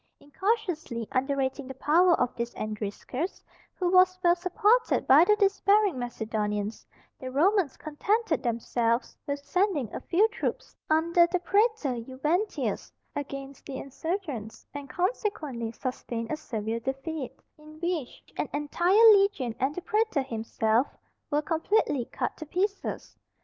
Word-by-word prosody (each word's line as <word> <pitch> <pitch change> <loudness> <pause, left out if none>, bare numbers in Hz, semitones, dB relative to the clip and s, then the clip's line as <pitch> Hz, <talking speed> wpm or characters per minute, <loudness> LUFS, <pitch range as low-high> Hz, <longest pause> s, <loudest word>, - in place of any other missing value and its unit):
Incautiously 335 - -2
underrating 270 0 -1
the 265 - -7
power 340 +6 +4
of 245 - 0
this 235 0 -4
Andriscus, 215 - -4 0.3
who 365 - -1
was 370 0 +5
well 345 0 +5
supported 395 +7 +2
by 280 +5 +8
the 420 +4 +4
despairing 400 - +3
Macedonians, 215 -3 -3 0.3
the 260 - -5
Romans 340 +4 +2
contented 340 - 0
themselves 235 0 0
with 285 0 -1
sending 360 - 0
a - - -3
few 390 +6 +3
troops, - - -4
under 335 +2 +4
the 360 +1 0
Pretor 375 - +1
Juventius, 300 - -2 0.2
against 275 -1 -6
the 270 -2 -5
insurgents, 280 - -5
and 285 -1 -7
consequently 325 - -2
sustained 235 -1 -5
a - - +1
severe 225 -6 -4
defeat, 270 +3 -5 0.2
in 305 +1 -14
which 340 -7 -3
an - - -2
entire 350 +9 +4
legion 395 - +2
and 275 +3 0
the 360 - -4
Pretor 430 -9 +1
himself 225 0 0 0.4
were 295 +1 +1
completely 320 - +1
cut - - -3
to 315 - -8
pieces. 390 +5 -2
295 Hz, 130 wpm, -28 LUFS, 250-365 Hz, 0.4 s, by